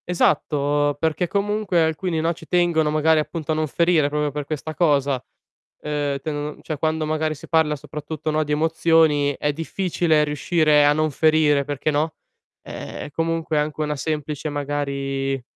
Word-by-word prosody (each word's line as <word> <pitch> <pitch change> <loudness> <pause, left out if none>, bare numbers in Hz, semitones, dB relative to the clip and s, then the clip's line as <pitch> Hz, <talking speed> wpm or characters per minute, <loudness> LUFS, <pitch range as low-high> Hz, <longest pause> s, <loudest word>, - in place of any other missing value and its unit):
Esatto, 145 -4 +1
perché 160 +3 0
comunque 205 -1 0
alcuni, 160 +1 -1
no, 165 +2 +1
ci - - -14
tengono 170 -3 +2
magari 155 +1 +3
appunto 155 +1 -3
a - - +1
non 155 0 0
ferire 165 -1 +2
proprio 150 0 -1
per 145 0 -4
questa 155 +1 -5
cosa. 140 -6 +1 0.6
Ehm, 145 -2 -2
tendono 150 0 -4
cioè 155 -3 -5
quando 155 +1 0
magari 155 0 -1
si 145 - -13
parla 160 -2 +2
soprattutto, 150 +2 -5
no, 155 0 +1
di 150 - -3
emozioni, 160 -2 +3
è 150 - 0
difficile 165 -1 0
riuscire 150 0 +3
a 145 - +5
non 155 +1 +1
ferire, 150 -1 +3
perché, 145 +1 -2
no, 150 +2 0 0.5
ehm, - - -7
è - - -11
comunque 165 0 -1
anche 150 +1 -2
una 150 -1 -1
semplice 150 +1 -3
magari 140 -2 -2
155 Hz, 160 wpm, -22 LUFS, 145-160 Hz, 0.6 s, a